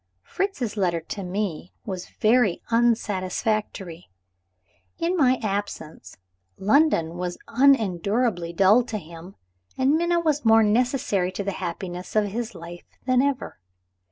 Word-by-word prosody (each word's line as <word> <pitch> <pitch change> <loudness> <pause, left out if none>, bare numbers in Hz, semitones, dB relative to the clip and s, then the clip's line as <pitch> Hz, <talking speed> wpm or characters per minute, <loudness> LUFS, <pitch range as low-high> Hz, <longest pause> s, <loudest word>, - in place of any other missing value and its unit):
Fritz's 265 - -3
letter 175 -4 +1
to 170 +5 -7
me 180 -2 -4
was 185 -3 -6
very 220 -4 +2
unsatisfactory. 210 -5 -1 0.9
In 340 +2 0
my 260 -6 +3
absence, 200 -6 -5 0.4
London 195 - +2
was 180 0 -4
unendurably 220 -6 +2
dull 195 +7 +4
to 220 - -4
him, 170 +1 -11 0.4
and 265 +2 +3
Minna 345 +2 +2
was 305 -3 0
more 225 -1 +6
necessary 215 -4 +1
to 200 - -3
the 200 - -2
happiness 180 0 -6
of 215 -1 +3
his 235 0 -4
life 170 +1 -11
than 255 -1 +3
ever. 280 - -2
210 Hz, 125 wpm, -24 LUFS, 180-250 Hz, 0.9 s, more